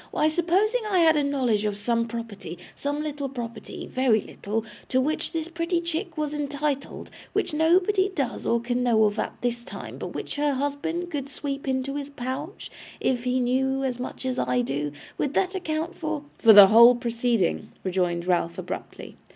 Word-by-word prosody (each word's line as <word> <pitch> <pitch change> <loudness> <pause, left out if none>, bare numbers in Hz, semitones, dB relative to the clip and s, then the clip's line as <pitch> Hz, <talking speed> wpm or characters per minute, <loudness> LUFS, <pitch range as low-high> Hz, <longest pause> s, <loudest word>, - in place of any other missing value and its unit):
Why, 310 - +2
supposing 370 +9 +2
I 370 -3 +3
had 320 -1 +6
a 295 - +2
knowledge 255 -7 +1
of 210 -1 -1
some 230 +2 0
property 225 -7 -6 0.2
some 290 +1 -2
little 290 -2 -3
property 235 -3 -7
very 255 -4 +2
little 215 +2 -4 0.2
to 260 - +2
which 300 +4 -1
this 325 -1 -3
pretty 335 +1 -1
chick 340 +1 -3
was 300 -1 -1
entitled; 290 -1 -3 0.2
which - - 0
nobody 365 +5 +3
does 275 -10 -3
or 235 - +3
can 245 +1 -1
know 235 -3 +4
of 210 0 +1
at - - -2
this 240 -1 -1
time, - - -8
but - - -6
which - - -5
her 290 0 +2
husband 290 +6 -2
could 280 -3 -3
sweep 275 0 -5
into 265 +1 -1
his 285 -1 -5
pouch, 280 +6 -6 0.3
if 250 -1 0
he 250 +1 +1
knew 265 +2 +1
as 250 -2 -2
much 255 +1 -6
as 255 -1 -1
I 125 0 +1
do, 140 +4 -2 0.3
would 285 0 -1
that 375 0 +1
account 335 -2 -3
for 310 -2 -3
' - - -33
'For 225 - +7
the 200 -2 +10
whole 235 +3 +8
proceeding,' 235 -5 0
rejoined 180 -2 0
Ralph, 170 -2 0
abruptly. - - -7
265 Hz, 185 wpm, -25 LUFS, 230-310 Hz, 0.3 s, the